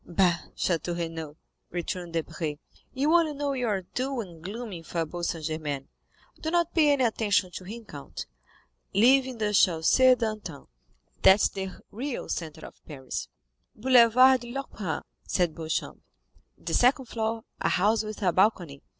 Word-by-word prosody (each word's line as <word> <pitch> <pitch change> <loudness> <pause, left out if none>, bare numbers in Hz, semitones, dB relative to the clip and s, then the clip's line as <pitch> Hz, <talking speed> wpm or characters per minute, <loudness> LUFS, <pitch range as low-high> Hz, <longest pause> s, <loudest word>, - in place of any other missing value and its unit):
"Bah! 175 -1 +2 0.2
Château 175 0 -1
Renaud," 160 -3 -5 0.3
returned 175 0 -4
Debray, 160 -2 -3 0.4
"you 290 +5 +1
only 330 -3 +3
know 285 0 -1
your 225 -7 -1
dull 260 -1 -1
and 170 -6 -11
gloomy 205 -2 -6
Faubourg 165 +1 -4
Saint 165 -3 -3
Germain; 150 -4 -3 0.5
do 320 - -2
not 345 0 +1
pay 300 -3 +5
any 275 -2 +1
attention 210 -5 +1
to 185 - -7
him, 225 +4 -8
count—live 145 - -1
in 255 -2 -6
the 210 -1 -1
Chaussée 205 +8 +5
d'Antin, 215 - -4 0.6
that's 190 +2 +6
the 190 -1 -4 0.2
real 255 +4 -4
centre 160 -2 -5
of - - -14
Paris." 130 - -5 0.5
"Boulevard 255 +2 +6
de 240 0 -8
l'Opéra," 215 - -4 0.2
said 175 -4 0
Beauchamp; 160 0 -4 0.6
"the - - -5
second 260 +2 +3
floor—a 225 -1 -3
house 210 +5 +2
with 215 0 -6
a 180 -2 +3
balcony. 180 -8 +1
200 Hz, 140 wpm, -27 LUFS, 165-245 Hz, 0.6 s, that's